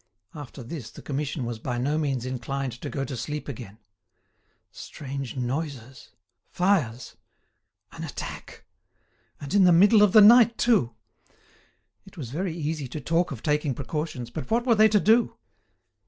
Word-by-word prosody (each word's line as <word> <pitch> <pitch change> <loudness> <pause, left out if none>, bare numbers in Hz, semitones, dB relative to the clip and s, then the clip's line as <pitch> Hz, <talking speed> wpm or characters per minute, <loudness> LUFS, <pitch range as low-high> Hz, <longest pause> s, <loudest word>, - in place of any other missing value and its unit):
After 140 -3 -9
this 125 -1 -7
the - - -13
Commission 145 -1 -3
was 115 -1 -5
by 120 +1 -3
no 140 +5 0
means 135 -5 -2
inclined 130 +1 -3
to - - -5
go 135 -1 -3
to 130 - -6
sleep 150 +6 -5
again. 110 -6 -8 0.9
Strange 140 -2 -7
noises! 130 -1 -5 0.4
Fires! 150 - 0 0.7
An - - -8
attack! - - -8 0.7
And 145 +4 -7
in 200 -1 +5
the 180 - +6
middle 205 +5 +6
of 210 -2 +5
the 215 - +9
night 230 +2 +7
too! 195 - +2 1.1
It - - -17
was 125 -7 -7
very 170 +3 -3
easy 155 -3 -3
to 150 - -6
talk 165 +3 0
of 125 -5 -7
taking 150 -3 0
precautions, 140 -2 -5
but 125 - -6
what 235 +2 +1
were 240 - +4
they 215 0 +6
to 210 0 +3
do? 225 +4 +3
145 Hz, 155 wpm, -25 LUFS, 125-180 Hz, 1.1 s, the